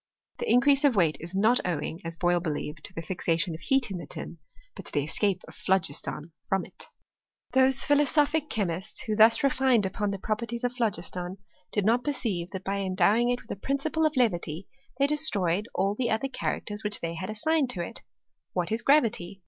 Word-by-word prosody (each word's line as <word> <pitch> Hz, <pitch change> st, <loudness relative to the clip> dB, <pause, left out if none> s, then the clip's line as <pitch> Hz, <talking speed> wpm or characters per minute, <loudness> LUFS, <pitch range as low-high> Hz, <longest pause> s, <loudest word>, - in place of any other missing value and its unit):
The 475 Hz, -, -2 dB
increase 275 Hz, +3 st, +5 dB
of 280 Hz, -5 st, +4 dB
weight 165 Hz, -6 st, +3 dB
is 170 Hz, +3 st, -6 dB
not 220 Hz, +5 st, +4 dB
owing, 165 Hz, -1 st, -3 dB
as 165 Hz, 0 st, -4 dB
Boyle 175 Hz, +1 st, +2 dB
believed, 155 Hz, -2 st, -4 dB
to -, -, -10 dB
the 165 Hz, -, -4 dB
fixation 170 Hz, 0 st, 0 dB
of 160 Hz, -, -7 dB
heat 270 Hz, -5 st, +1 dB
in 185 Hz, -, -3 dB
the -, -, -8 dB
tin, 165 Hz, -, -7 dB, 0.4 s
but -, -, -9 dB
to -, -, -7 dB
the 145 Hz, -, 0 dB
escape 190 Hz, +5 st, 0 dB
of -, -, -12 dB
phlo 190 Hz, 0 st, +2 dB
giston 155 Hz, 0 st, -5 dB, 0.2 s
from 195 Hz, -1 st, +1 dB
it. -, -, -7 dB, 0.6 s
Those 265 Hz, 0 st, +5 dB
philosophic 295 Hz, +1 st, +2 dB
chemists, 190 Hz, -1 st, -2 dB
who 215 Hz, -, -2 dB
thus 225 Hz, +3 st, +6 dB
refined 260 Hz, -5 st, +3 dB
upon 205 Hz, +2 st, -1 dB
the 200 Hz, -, -2 dB
properties 230 Hz, +4 st, -3 dB
of 245 Hz, 0 st, 0 dB
phlogiston, 185 Hz, -5 st, -2 dB, 0.3 s
did 205 Hz, -2 st, 0 dB
not 235 Hz, +3 st, +3 dB
perceive 210 Hz, -12 st, -2 dB
that 190 Hz, 0 st, -6 dB
by 200 Hz, +1 st, -2 dB
endowing 195 Hz, +5 st, +2 dB
it 245 Hz, 0 st, -1 dB
with -, -, -11 dB
a 200 Hz, -, -6 dB
principle 290 Hz, +4 st, 0 dB
of 305 Hz, -3 st, -5 dB
levity, 175 Hz, -7 st, 0 dB, 0.3 s
they 275 Hz, -, +3 dB
destroyed 210 Hz, -, +1 dB
all 195 Hz, +1 st, +1 dB
the 240 Hz, +2 st, -1 dB
other 220 Hz, +5 st, 0 dB
characters 210 Hz, -4 st, -4 dB
which 210 Hz, -1 st, -2 dB
they 165 Hz, 0 st, -3 dB
had 175 Hz, +4 st, -5 dB
assigned 275 Hz, +6 st, +1 dB
to 180 Hz, -8 st, -2 dB
it. -, -, -4 dB, 0.5 s
What 180 Hz, +1 st, -1 dB
is 225 Hz, +2 st, 0 dB
gravity 225 Hz, -10 st, +2 dB
210 Hz, 200 wpm, -27 LUFS, 175-250 Hz, 0.6 s, thus